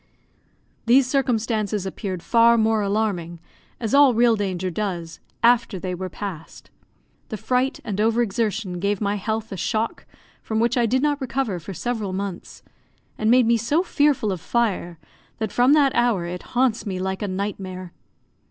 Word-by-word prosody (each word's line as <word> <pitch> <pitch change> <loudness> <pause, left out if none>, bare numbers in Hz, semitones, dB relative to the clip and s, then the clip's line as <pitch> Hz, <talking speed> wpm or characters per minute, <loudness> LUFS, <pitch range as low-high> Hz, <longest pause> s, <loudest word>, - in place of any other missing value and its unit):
These 260 +3 +6
circumstances 225 -6 0
appeared 190 -2 -5
far 235 0 +5
more 220 -1 +2
alarming, 200 -5 -1 0.4
as 225 -3 -3
all 280 -3 +6
real 235 0 +4
danger 185 -3 -2
does, 175 -4 -4 0.2
after 235 -3 +3
they 180 0 -4
were 185 +1 -5
past. 180 -4 -8 0.6
The 215 - -4
fright 250 +5 0
and 205 -1 -2
over 230 +2 +3
exertion 210 -4 -2
gave 200 +1 0
my 200 -1 0
health 220 +2 -3
a 195 - -5
shock 225 +4 -2 0.3
from 220 0 -2
which 235 +1 +2
I 240 -2 +2
did 260 +4 +1
not 295 -1 +1
recover 255 -7 -2
for 175 +4 -8
several 215 -1 -3
months, 195 -1 -6 0.5
and 215 - 0
made 250 0 +5
me 230 +1 +3
so 285 +10 +1
fearful 290 - +1
of 180 -3 -4
fire, 200 -7 -1 0.4
that 220 -2 -3
from 250 +3 +4
that 285 -3 +4
hour 235 -8 +1
it 180 +1 -5 0.2
haunts 245 -3 +2
me 195 -4 -4
like 190 +1 -3
a 205 - -1
nightmare. 185 -2 -5
215 Hz, 165 wpm, -23 LUFS, 190-240 Hz, 0.6 s, These